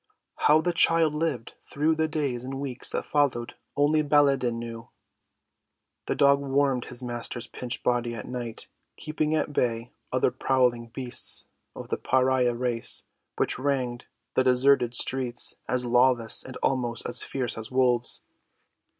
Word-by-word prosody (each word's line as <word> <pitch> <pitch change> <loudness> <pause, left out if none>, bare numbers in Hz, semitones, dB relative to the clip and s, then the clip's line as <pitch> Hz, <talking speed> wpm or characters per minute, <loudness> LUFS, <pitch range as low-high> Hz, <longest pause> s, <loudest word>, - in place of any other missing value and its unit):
How 155 +1 +5
the 175 +1 -1
child 165 -2 +3
lived 150 -7 -3
through 150 +3 0
the 160 0 0
days 140 -6 -2
and 135 +1 -6
weeks 130 -3 0
that - - -1
followed 140 -5 0 0.2
only 150 +2 +3
Baladan 140 -5 +2
knew. 115 -1 -8 1.2
The - - -1
dog 140 0 +4
warmed 135 -2 0
his 125 0 -6
master's 120 0 -5
pinched 125 -1 -6
body 120 -1 0
at 105 - -8
night, 120 -2 -6 0.3
keeping 155 0 -2
at 150 -1 -2
bay 115 -2 -1 0.2
other - - +1
prowling 125 -3 0
beasts 125 +1 +1 0.3
of - - -9
the - - -1
pariah 130 -2 +1
race 120 -1 +1 0.3
which - - 0
ranged 130 -3 -2 0.3
the 130 - +2
deserted 125 -1 +3
streets, 125 -1 +2
as 125 0 +1
lawless 120 -1 +3
and 130 - -9
almost 120 -3 -1
as - - +3
fierce 130 -3 -2
as 110 0 -6
wolves. 125 -2 +1
125 Hz, 145 wpm, -26 LUFS, 120-140 Hz, 1.2 s, How